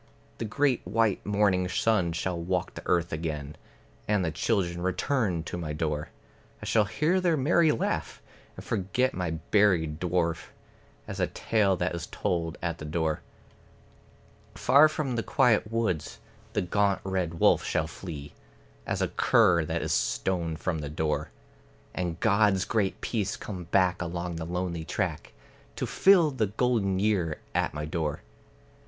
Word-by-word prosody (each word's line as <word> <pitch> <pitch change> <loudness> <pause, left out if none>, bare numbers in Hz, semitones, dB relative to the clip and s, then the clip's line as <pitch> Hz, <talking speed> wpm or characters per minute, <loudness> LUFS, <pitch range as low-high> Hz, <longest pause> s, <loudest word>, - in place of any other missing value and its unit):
The - - -2
great 135 +3 +1
white 105 +2 +1
morning 100 -3 +2
sun 95 -3 +1
shall 90 +2 -2
walk 90 +1 -1
the - - -8
earth 85 -1 +1
again, 75 -2 -4 0.5
And 105 -3 +2
the 80 - -1
children 85 0 0
return 95 - 0
to 85 - -5
my 75 -3 -4
door, 75 -1 -2 0.5
I - - -8
shall 110 -2 +3
hear 165 - +1
their 170 -3 +2
merry 155 +3 +4
laugh, 115 - -2 0.4
and - - -10
forget 105 +7 0
my 90 -2 -2
buried 80 -2 +2
dwarf, 85 -2 -1 0.6
As - - -6
a - - +2
tale 105 -4 +1
that 90 0 -1
is 85 -2 -5
told 85 -2 -2
at 85 -1 -2
the 75 - -6
door. 80 0 -1 1.3
Far 145 +3 +6
from 140 -6 -2
the - - +1
quiet 115 -6 +2
woods 110 -9 -1 0.4
the 105 - 0
gaunt 100 +2 +1
red 95 -3 -2
wolf - - +4
shall - - 0
flee, 75 -6 -8 0.5
As - - 0
a - - +1
cur 85 -3 +4
that - - -2
is - - 0
stoned 85 -4 0
from 85 -4 -2
the 75 -1 -5
door; 75 0 -1 0.6
And 85 -2 -3
God's 105 -3 +3
great 105 -4 -1
peace 105 -4 -2
come 90 -5 -7
back 90 0 +2
along 85 0 -3
the 80 - -4
lonely 90 -2 -3
track, 80 -4 -3 0.4
To - - -2
fill 180 -6 +5
the 115 -6 0
golden 105 -3 +1
year 95 -6 0
at - - 0
my 75 0 -3
door. 75 -3 -3
90 Hz, 155 wpm, -28 LUFS, 85-110 Hz, 1.3 s, Far